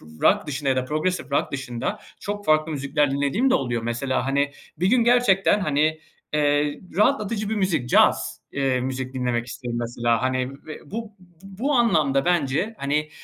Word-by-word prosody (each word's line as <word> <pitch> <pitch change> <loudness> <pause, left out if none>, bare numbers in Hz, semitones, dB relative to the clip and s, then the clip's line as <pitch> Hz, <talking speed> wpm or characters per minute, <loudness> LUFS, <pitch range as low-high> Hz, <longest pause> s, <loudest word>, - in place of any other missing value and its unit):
p - - -17 0.2
rock - - +4
dışında 145 -1 -3
ya 130 - +1
da 130 - 0
progresif 155 0 -2
rock - - 0
dışında 135 - -4 0.2
çok 205 0 -5
farklı 155 +1 +3
müzikler 145 0 0
dinlediğim 145 - +1
de - - +4
oluyor. 120 -4 -1
Mesela, 120 +3 -1
hani, 140 +1 +1 0.3
bir 180 - +1
gün 235 +3 +4
gerçekten, 230 -5 +4
hani, 155 -1 +1 0.3
eee, 145 0 +1 0.2
rahatlatıcı 215 -2 +1
bir - - +1
müzik, 170 -11 0
caz, - - +3
eee, 135 -2 0
müzik 130 0 -4
dinlemek 125 -2 -1
isterim, 120 -1 -5
mesela. 120 -1 0
Hani 130 0 0 0.2
ve 155 -2 -10
bu 225 -1 -5 0.3
bu 195 +9 -3
anlamda, 155 - +3
bence, 175 +4 +1
hani, 150 +2 -1
145 Hz, 170 wpm, -24 LUFS, 130-195 Hz, 0.3 s, rock